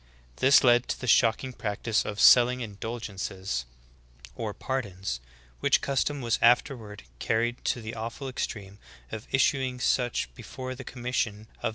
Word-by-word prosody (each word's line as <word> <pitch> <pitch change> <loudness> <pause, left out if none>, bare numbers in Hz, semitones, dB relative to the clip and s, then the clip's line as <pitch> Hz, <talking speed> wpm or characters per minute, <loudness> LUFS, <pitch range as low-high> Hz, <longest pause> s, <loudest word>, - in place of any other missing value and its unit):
This 135 +2 +6
led 120 -1 +5
to - - -3
the - - -5
shocking 120 +2 +3
practice 110 0 -1
of 105 0 -5
selling 125 +1 +7
indulgences 100 - -4 0.7
or 110 - -4
pardons, 100 - -4 0.4
which - - +3
custom 140 +1 -1
was 120 -2 0
afterward 115 -3 +2 0.2
carried 120 +2 0
to 120 - 0
the 110 +1 -5
aw 110 +1 -4
ful 135 +3 -8
extreme 100 -5 -5 0.3
of 110 - -7
issuing 130 -1 +1
such 120 - 0
before 130 - -7
the 130 +1 -9
commission 125 -3 -2
of - - -14
the 105 - -13
'iMosheim, 110 - -24
"Eccl. - - -1
115 Hz, 160 wpm, -28 LUFS, 105-125 Hz, 0.7 s, selling